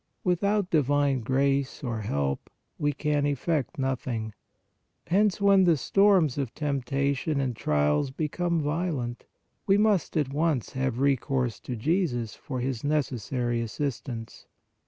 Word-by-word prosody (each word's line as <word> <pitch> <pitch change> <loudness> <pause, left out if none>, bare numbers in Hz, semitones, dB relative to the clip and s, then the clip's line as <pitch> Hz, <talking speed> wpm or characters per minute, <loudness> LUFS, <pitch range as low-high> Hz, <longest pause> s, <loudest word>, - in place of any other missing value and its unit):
Without 200 +2 +1
divine 145 -2 +2
grace 135 +4 0
or 115 -4 -2
help 70 -9 -2 0.3
we 145 0 +1
can 150 0 0
effect 145 +2 -1
nothing. 125 -5 -2 0.7
Hence 200 +2 +2
when 200 -2 +5
the 170 -3 +4
storms 185 -4 +3
of 130 -5 -3
tempta 140 -1 0
tion 145 +1 -1
and 130 -3 -1
trials 75 - +1
become 160 +4 -1
violent, 145 -6 -2 0.4
we 195 0 +5
must 210 -5 +2
at 140 -3 0
once 150 -5 0
have 130 -2 -1
recourse 130 -2 0
to 125 - -5
Jesus 120 - 0
for 130 -3 -5
His 125 -2 -3
necessary 125 -5 -1
assistance. 115 -1 -5
140 Hz, 130 wpm, -27 LUFS, 125-160 Hz, 0.7 s, when